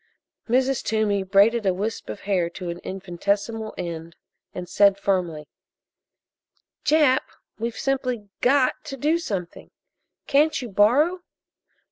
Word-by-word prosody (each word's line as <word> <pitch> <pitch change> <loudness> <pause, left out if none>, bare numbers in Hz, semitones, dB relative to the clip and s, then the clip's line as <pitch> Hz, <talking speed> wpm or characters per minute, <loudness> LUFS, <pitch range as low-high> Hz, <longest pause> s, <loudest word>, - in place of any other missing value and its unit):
Mrs. 260 +2 +2
Toomey 215 -2 +1
braided 200 +4 +3
a 185 - +2
wisp 215 +4 -4
of - - -6
hair 185 -4 0
to 175 0 -6
an 170 - -7
infinitesimal 200 +4 -3
end 165 -1 -6 0.4
and 180 -1 -7
said 200 0 +4
firmly: 175 -7 -1 1.4
"Jap, 295 -4 +4 0.4
we've 230 +1 -3
simply 255 -5 -2
got 265 +2 +2
to 275 -3 -6
do 305 +5 +1
something! 190 - -5 0.6
Can't 300 +3 +3
you 245 -3 -6
borrow?" 275 - +3
210 Hz, 120 wpm, -24 LUFS, 190-260 Hz, 1.4 s, said